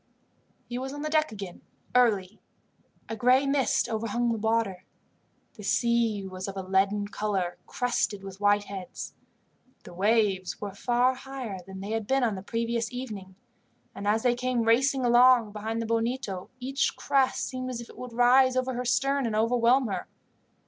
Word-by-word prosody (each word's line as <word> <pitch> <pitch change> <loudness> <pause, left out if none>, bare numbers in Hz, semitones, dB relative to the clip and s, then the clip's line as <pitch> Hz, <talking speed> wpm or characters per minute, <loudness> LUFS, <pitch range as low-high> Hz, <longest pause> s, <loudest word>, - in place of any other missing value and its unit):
He 245 0 -4
was 265 +1 -5
on 290 +1 -6
deck 310 -1 +1
again 195 -4 -8 0.3
early. 215 -5 +2 0.7
A 225 - -4
gray 250 +4 +4
mist 275 -4 +1
overhung 230 +1 -1
the 225 - -1
water. 220 -4 0 0.7
The 215 - -12
sea 230 -1 +1
was 185 0 -6
of 195 0 -6
a 190 - -3
leaden 195 +2 +1
colour, 195 -4 -2
crested 240 -5 -1
with 195 0 -9
white 205 0 +4
heads. 195 -3 -7 0.7
The - - -11
waves 195 -1 +1
were 205 -2 -5
far 245 +5 +2
higher 255 -6 -6
than 190 0 -8
they 200 +2 -5
had 225 -2 -2
been 270 -1 +2
on 225 -3 +2
the 190 - -6
previous 230 +2 -2
evening, 210 -7 -7 0.6
and 200 - -6
as 220 +2 +2
they 245 -1 +4
came 250 -1 -1
racing 255 +3 +3
along 240 -2 +5
behind 220 +2 -4
the 230 - -2
Bonito 230 -4 -2
each 270 +2 0
crest 265 -1 +1
seemed 255 -1 -4
as 250 -2 -4
if 235 - -8
it - - -15
would 250 -2 -7
rise 255 +2 +5
over 255 0 0
her 250 +1 -3
stern 270 +2 +1
and 215 - -2
overwhelm 240 +3 +3
her. 195 -5 -3
230 Hz, 170 wpm, -27 LUFS, 205-250 Hz, 0.7 s, along